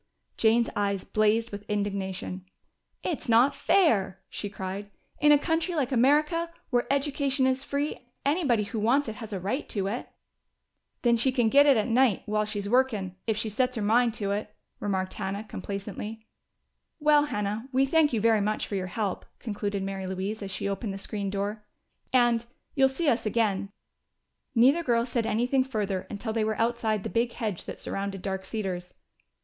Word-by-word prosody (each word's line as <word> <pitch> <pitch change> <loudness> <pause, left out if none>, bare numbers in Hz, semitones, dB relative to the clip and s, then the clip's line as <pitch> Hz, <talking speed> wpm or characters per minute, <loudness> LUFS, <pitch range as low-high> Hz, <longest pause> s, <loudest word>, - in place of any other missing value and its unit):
Jane's 230 +1 +3
eyes 200 -2 0
blazed 220 +2 +1
with 205 0 -6
indignation. 195 -3 -3 0.6
"It's 320 -8 -3
not 240 +5 +5
fair!" 205 - +2
she 205 - -4
cried. 195 +1 -5 0.3
"In 295 - +6
a 295 - +8
country 325 +3 0
like 280 -4 0
America, 300 +7 +3 0.2
where 245 +1 +1
education 280 -1 +1
is 260 +1 +1
free. 280 -3 -3 0.2
Anybody 280 -7 +2
who 220 +2 -4
wants 250 +6 +2
it 220 -1 -5
has 225 -2 -8
a 195 - -3
right 205 +11 -3
to 200 -3 -1
it." 215 +5 -3 0.9
"Then 235 -1 +4
she 260 +3 +3
can 240 -4 +2
git 285 +4 +6
it 275 -4 +6
at 215 - +1
night 245 -3 +3
school 210 - -6
while 210 0 +2
she's 205 -1 -3
workin', 215 -6 +1
if 220 -2 +1
she 220 - -1
sets 250 +4 0
her 220 - -2
mind 230 +2 +3
to 200 -3 -2
it," 205 +1 -3 0.2
remarked 190 -2 -1
Hannah 200 +2 -3
complacently. 210 +2 -6 0.7
"Well, 295 -1 +5
Hannah, 210 -1 -3
we 265 +1 +3
thank 305 +1 +3
you 230 - +1
very 220 0 +4
much 215 +1 0
for - - -8
your 190 -2 -1
help," 200 0 -2
concluded 205 -3 -3
Mary 195 -1 -4
Louise 190 +4 -3
as 200 - -5
she 195 - -3
opened 200 +1 -3
the - - -5
screen 200 0 -4
door. 205 +2 -3 0.5
"And 240 -2 +4 0.3
you'll 270 -1 +4
see 305 +5 -2
us 240 -5 +2
again!" 205 -3 0 0.8
Neither 265 +8 +5
girl 235 -6 +2
said 235 -2 -1
anything 245 +5 +2
further 210 -7 -2
until 220 +2 -4
they 225 -1 +1
were 215 0 -1
outside 225 -3 0
the - - -3
big 235 +4 +1
hedge 210 -6 -3
that - - -7
surrounded 195 -1 -4
Dark 190 -1 -3
Cedars. 185 -5 -4
220 Hz, 180 wpm, -27 LUFS, 200-260 Hz, 0.9 s, a